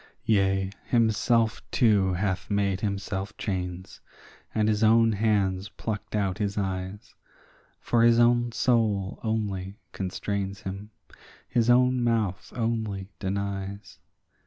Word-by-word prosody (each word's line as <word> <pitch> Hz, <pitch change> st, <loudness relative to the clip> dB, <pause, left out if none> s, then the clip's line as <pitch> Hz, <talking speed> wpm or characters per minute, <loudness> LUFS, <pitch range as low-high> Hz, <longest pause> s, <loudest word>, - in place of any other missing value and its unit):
Yea, 95 Hz, -2 st, +2 dB, 0.2 s
himself 115 Hz, 0 st, +2 dB
too 100 Hz, -5 st, +3 dB
hath 95 Hz, +1 st, -2 dB
made 100 Hz, -2 st, 0 dB
himself 100 Hz, -1 st, -3 dB
chains, 90 Hz, -2 st, -4 dB, 0.5 s
and 110 Hz, -1 st, +2 dB
his 110 Hz, 0 st, +1 dB
own 115 Hz, +1 st, +5 dB
hands 100 Hz, -3 st, +1 dB
plucked 105 Hz, -1 st, -5 dB
out 100 Hz, -1 st, 0 dB
his 100 Hz, -1 st, -2 dB
eyes; 95 Hz, 0 st, -4 dB, 0.7 s
For 120 Hz, -, +1 dB
his 115 Hz, 0 st, +6 dB
own 120 Hz, 0 st, +4 dB
soul 110 Hz, -5 st, +1 dB
only 100 Hz, -3 st, -2 dB
constrains 100 Hz, +1 st, -3 dB
him, 100 Hz, +2 st, -6 dB, 0.6 s
his 120 Hz, -1 st, +1 dB
own 125 Hz, 0 st, +4 dB
mouth 110 Hz, -6 st, 0 dB
only 110 Hz, -5 st, -2 dB
denies. 100 Hz, +1 st, -4 dB
100 Hz, 110 wpm, -27 LUFS, 95-115 Hz, 0.7 s, his